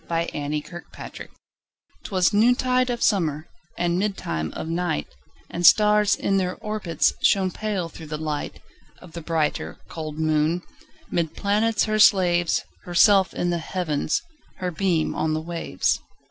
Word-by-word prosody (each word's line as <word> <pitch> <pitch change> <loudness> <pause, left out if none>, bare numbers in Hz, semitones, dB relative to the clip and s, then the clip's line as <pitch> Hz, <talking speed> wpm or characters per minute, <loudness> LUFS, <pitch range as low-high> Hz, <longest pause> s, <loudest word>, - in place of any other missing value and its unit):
1827 165 0 -3
Evening - - -8
Star - - -9 0.8
'Twas 185 -1 +1
noontide 250 +3 +3
of 240 -1 -2
summer, 160 -6 +1 0.3
And 175 +1 0
midtime 80 - -2
of - - -5
night, 165 - -1 0.5
And 175 - -4
stars, 210 +1 +6
in 195 - 0
their 185 -1 -1
orbits, 210 -7 0
Shone 190 -2 +3
pale, 200 -3 -3
through 160 -1 -11
the 150 0 -4
light 150 -1 -4 0.4
Of 180 - -14
the 170 - -7
brighter, 160 -2 -1
cold 155 -2 -6
moon. 155 +2 +1 0.5
'Mid 165 -3 -1
planets 215 +2 +1
her 215 0 0
slaves, 175 -5 +4 0.2
Herself 190 +2 +4
in 175 - 0
the 170 - -1
Heavens, 155 -3 -2 0.3
Her 180 -1 -3
beam 170 -2 0
on 155 0 -1
the - - -1
waves. 165 - -1
175 Hz, 145 wpm, -24 LUFS, 160-200 Hz, 0.8 s, stars